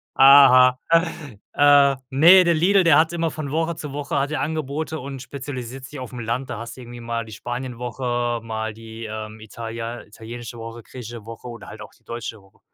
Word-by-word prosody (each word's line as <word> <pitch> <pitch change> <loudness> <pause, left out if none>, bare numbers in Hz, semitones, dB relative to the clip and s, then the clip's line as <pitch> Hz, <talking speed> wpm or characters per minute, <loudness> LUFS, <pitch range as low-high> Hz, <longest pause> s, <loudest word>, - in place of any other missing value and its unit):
Aha. 130 -2 +8 0.8
Äh, 145 -1 +5
ne, 170 +7 +7
der 170 -1 +3
Lidl, 185 +4 +4
der 165 -4 +6
hat 160 +2 +2
immer 165 -1 -1
von 150 -2 -5
Woche 165 +1 -1
zu 150 -2 -7
Woche 145 -1 -2
hat 140 - -1
er 155 - -1
Angebote 155 +1 -3
und 135 -1 -7
spezialisiert 130 -1 -7
sich 145 +1 -9
aufm 125 -1 -7
Land. 120 +4 -3
Da - - -4
hast 115 +1 -8
du - - -10
irgendwie 120 0 -10
mal 115 -1 -3
die 110 - -12
Spanienwoche, 120 0 -3
mal 110 -1 -4
die, 115 +1 -9
ähm, 110 0 -7
italian 115 +2 -7
italienische 115 +3 -9
Woche, 115 +1 -8
griechische 120 -2 -9
Woche 115 +2 -9
oder 120 -1 -9
halt - - -10
auch - - -10
die - - -34
deutsche 115 -2 -7
Woche. 95 0 -25
125 Hz, 195 wpm, -22 LUFS, 115-145 Hz, 0.8 s, Aha